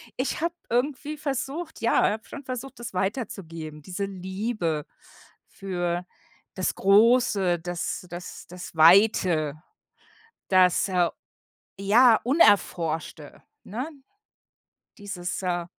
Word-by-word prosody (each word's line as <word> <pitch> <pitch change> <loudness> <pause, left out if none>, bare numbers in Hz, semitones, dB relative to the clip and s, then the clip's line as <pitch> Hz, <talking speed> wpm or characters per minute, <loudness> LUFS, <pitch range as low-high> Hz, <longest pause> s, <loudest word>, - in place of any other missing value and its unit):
ich 255 - -2
habe 335 +1 0 0.2
irgendwie 285 +5 -1
versucht 295 +2 -4
ja, 230 - +3
habe 220 +1 -5
schon 285 -1 -10
versucht, 255 +1 -6
das 235 -5 -7
weiterzugeben, 170 - -4
diese 185 +5 -4
Liebe 190 -4 -3 0.6
für 175 -2 -3 0.5
das 185 - -1
Große, 200 -3 +4
das 175 +2 -4
das 175 +1 -9
das 180 +1 -9
Weite, 165 -3 +4 0.9
das, 185 0 +4
äh, 180 -2 +2 0.7
ja, 220 +4 +5
Unerforschte, 175 - +1 0.2
ne? 250 +9 -5 1.1
Dieses, 200 -3 -5
äh 175 -2 -1
195 Hz, 100 wpm, -26 LUFS, 175-240 Hz, 1.1 s, ja